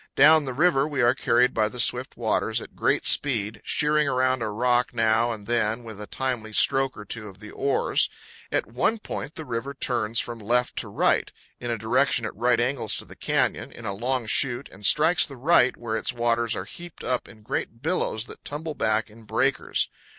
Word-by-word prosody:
Down 155 +2 +6
the 130 - -3
river 145 -1 +3
we 145 -4 -1
are 120 +1 +5
carried 125 0 +2
by 110 -1 +1
the 125 - -8
swift 125 +1 +1
waters - - 0
at - - -11
great - - +1
speed, 110 -7 +2
sheering 150 0 +1
around 130 -1 +1
a 110 - -1
rock 120 +3 +1
now 115 +1 +2
and 105 -3 -7
then 115 0 0
with 110 -3 -9
a 105 - -7
timely 125 -5 -3
stroke 135 +4 +3
or 105 - -9
two 110 +1 -7
of 95 -1 -13
the 105 -1 -11
oars. 140 0 +1 0.4
At - - +1
one 125 - 0
point 155 -8 -6
the 160 - -7
river 125 +2 -4
turns 115 -4 +1
from 120 -1 -4
left 120 +4 0
to - - 0
right, - - +1 0.3
in 120 - -5
a 115 - -1
direction 120 +2 +1
at 110 - -5
right 120 +3 +2
angles 120 -2 0
to - - -2
the - - -13
canyon, - - -1
in - - -11
a 100 - -2
long 125 +4 -1
chute 125 +4 +1
and 95 +2 -15
strikes 160 +1 +4
the 140 - -11
right, 130 -2 +3
where 115 -2 -3
its - - -2
waters 120 -1 0
are 95 - -5
heaped 175 +9 -11
up 125 0 -1
in 110 -1 -16
great 115 +3 -4
billows 150 -9 -1
that - - -13
tumble 155 +2 -5
back 110 -4 0
in 110 +1 -17
breakers. - - 0
120 Hz, 210 wpm, -25 LUFS, 110-135 Hz, 0.4 s, Down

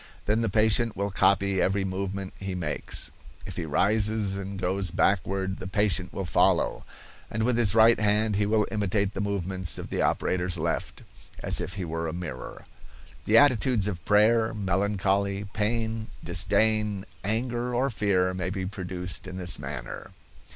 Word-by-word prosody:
Then 105 +2 +1
the 115 - 0
patient 110 +2 +2
will 100 +1 -1
copy 100 0 +2
every 95 +1 +1
movement 95 0 -4
he 95 -1 -4
makes. 80 -4 -2 0.3
If - - -7
he 80 - -4
rises 105 +4 +2
and 100 0 -5
goes 95 0 0
backward 95 +2 0
the 95 - -6
patient 95 -2 +1
will 95 - -4
follow, 85 - +2 0.4
and 110 +1 -2
with 125 +1 +2
his 110 -3 +2
right 115 +1 +6
hand 105 0 +2
he 100 0 +1
will 105 0 +2
imitate 100 -1 0
the 100 - -3
movements 95 -3 -1
of - - -7
the - - -1
operator's 90 -1 0
left, 80 0 -3 0.4
as - - 0
if 95 - -5
he 95 -3 -4
were 80 0 -3
a 80 - -4
mirror. 85 -8 -7 0.6
The 110 - +4
attitudes 125 -5 +4
of 90 -5 -4
prayer, 110 +2 +3
melancholy, 100 0 0
pain, 110 +1 -1 0.2
disdain, 100 +3 +1 0.2
anger 120 +3 -1
or 135 +3 +1
fear, 95 -4 +1
may 95 -1 -3
be 95 -1 -3
produced 95 -1 -6
in 95 0 -7
this 90 -2 +2
manner. - - -7
100 Hz, 160 wpm, -27 LUFS, 95-110 Hz, 0.6 s, right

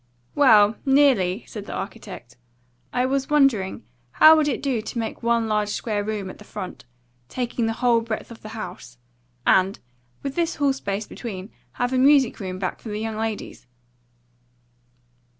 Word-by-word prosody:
"Well, 220 -7 +5
nearly," 260 -9 +3
said 210 -1 -8
the - - -6
architect. 190 - -8 0.6
"I 250 - +1
was 270 0 -1
wondering 265 - +2 0.3
how 315 +1 +8
would 310 -2 +2
it 270 - -2
do 260 -6 0
to 225 - -7
make 225 -1 -4
one 235 -1 +1
large 210 -1 0
square 210 -1 -2
room 210 -2 -3
at - - -15
the - - -11
front, 200 -7 -8 0.4
taking 240 -2 -2
the 225 - 0
whole 235 -2 +4
breadth 225 0 -5
of 230 - -11
the 215 - -9
house, 125 - -8 0.5
and, 190 +1 +3 0.5
with 275 -1 -3
this 340 +1 -1
hall 285 -2 +2
space 205 -5 -4
between, 200 -4 -7 0.2
have 245 +1 -1
a 255 - +2
music 275 -2 +4
room 185 -2 -5
back 185 -1 -3
for 225 - -8
the 210 - -3
young 220 0 -3
ladies?" 220 - -5
225 Hz, 170 wpm, -23 LUFS, 205-260 Hz, 0.6 s, how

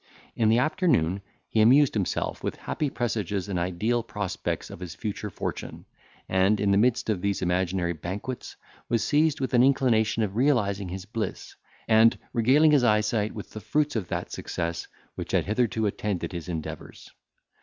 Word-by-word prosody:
In 110 -2 +2
the 115 - +4
afternoon 125 - +1 0.3
he 110 - +2
amused 135 +5 +6
himself 100 -4 -2
with - - -2
happy 150 - -3
presages 105 -6 -2
and 95 -3 -2
ideal 95 +7 0
prospects 105 -4 -4
of - - -9
his 90 -1 -7
future 105 0 -4
fortune, - - -6 0.4
and, 95 +3 +2
in 100 -1 +2
the 100 - +4
midst 125 +2 +2
of 105 -5 0
these 100 -1 -1
imaginary 90 0 0
banquets, 100 +10 -6 0.3
was 115 -2 +1
seized 155 0 +2
with 130 -1 -2
an 120 - +5
inclination 120 -5 +3
of 100 -2 -3
realising 105 -7 +1
his 95 +1 -6
bliss, 110 +1 -5 0.3
and 110 +1 +5 0.2
regaling 135 +7 +5
his 145 -4 +4
eyesight 105 -1 +1
with 105 - -8
the 110 - -8
fruits 150 +2 0
of 105 -6 -2
that - - -4
success 85 0 -4 0.3
which - - -6
had - - +2
hitherto 110 +1 0
attended 100 -2 -2
his 85 -1 -6
endeavours. 80 -3 -7
105 Hz, 165 wpm, -26 LUFS, 95-120 Hz, 0.4 s, amused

